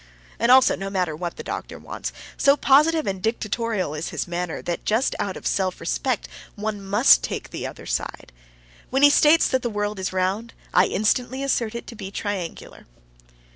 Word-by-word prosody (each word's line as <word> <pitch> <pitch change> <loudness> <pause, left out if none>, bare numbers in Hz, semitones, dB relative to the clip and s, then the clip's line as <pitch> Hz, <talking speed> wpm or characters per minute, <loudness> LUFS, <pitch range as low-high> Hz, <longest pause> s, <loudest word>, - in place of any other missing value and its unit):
And 235 +1 +3
also, 260 0 +6
no 195 0 -5
matter 180 -5 -1
what 170 +1 -5
the - - -6
doctor - - -6
wants, - - -6 0.2
so 280 +1 +4
positive 305 +4 +4
and 190 -1 -3
dictatorial 220 -5 -1
is 155 +2 -4
his - - -3
manner 175 -1 -3
that 175 - -3
just 225 +5 +1
out 195 -2 -2
of - - -12
self 185 -2 0
respect 245 +8 -1 0.3
one 210 -1 -4
must 195 - +5
take - - -5
the - - -4
other - - -10
side. - - -4 0.6
When 270 +2 +1
he 290 - +9
states 310 +3 +5
that 260 -1 +1
the 240 - -2
world 210 -1 -3
is 190 - -2
round, 190 +5 -2 0.2
I - - +5
instantly 250 +6 0
assert 235 -4 0
it 235 - -5
to 235 - -10
be 200 -3 -7
triangular. 195 -4 -5
210 Hz, 185 wpm, -23 LUFS, 185-250 Hz, 0.6 s, he